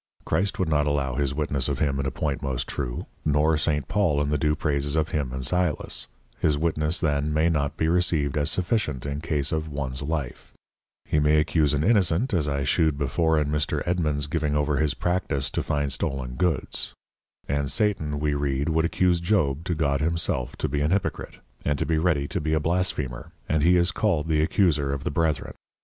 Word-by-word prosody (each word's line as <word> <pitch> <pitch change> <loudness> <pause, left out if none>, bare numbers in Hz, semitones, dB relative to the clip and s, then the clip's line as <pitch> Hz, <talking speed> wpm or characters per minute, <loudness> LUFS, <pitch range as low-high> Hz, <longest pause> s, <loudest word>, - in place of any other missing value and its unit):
Christ 95 +5 0
would 95 - 0
not 75 -1 +2
allow 70 -3 0
his 70 +1 0
Witness 70 -3 0
of 70 - -1
him 70 0 0
in 70 - -1
a - - +1
point 70 +1 -2
most 65 -1 -2
true; - - -4 0.2
nor 75 +1 +3
St. 75 -2 0
Paul 90 -9 +1
in 75 0 0
the 75 - +2
due 75 +1 +2
Praises 70 -1 0
of 80 0 +1
him 70 -5 -2
and 65 0 -4
Sylas; 90 0 -1 0.3
his 75 -2 +2
Witness 80 +1 0
then 75 -1 0
may 80 +2 +2
not 75 -2 -1
be 80 - +1
received 80 -5 +1
as 75 0 +1
sufficient 90 - -1
in 70 +1 -3
case 75 -3 0
of 80 0 -2
ones 70 -2 -3
Life: 75 -3 -4 0.5
He 75 - +1
may 75 +1 +4
accuse 75 -1 +2
an 70 - 0
Innocent, 100 +2 +2
as 80 -5 +1
I 70 -1 -1
shewed 80 0 +2
before 80 +3 +1
in 75 -1 0
Mr. 75 0 0
Edmund's 75 -5 +1
giving 75 0 -1
over 75 0 +1
his 75 -1 +1
Practice 80 -7 0
to - - -1
find 75 -1 -1
Stollen 65 -2 -2
Goods; 80 -1 -1 0.5
and 70 0 -1
Satan 80 -6 0
we 75 0 0
read 70 +1 -1
would 80 +1 +2
accuse 90 0 +2
Job 85 -6 +1
to 90 -2 -1
God 70 -2 0
himself 75 -5 -1
to - - -2
be 70 +1 -1
an 75 - +1
Hypocrite, 95 +1 -2 0.3
and 75 -1 0
to - - -1
be 80 -1 +1
ready 80 -4 +1
to - - -2
be 80 +1 -1
a - - +2
Blasphemer, 75 -6 -2
and 75 0 +1
he 90 +3 +5
is 85 +1 +3
called 85 -9 0
the 75 -1 +3
Accuser 75 -5 +2
of 70 -1 -3
the - - -2
Brethren. 80 0 -1
75 Hz, 205 wpm, -25 LUFS, 70-80 Hz, 0.5 s, he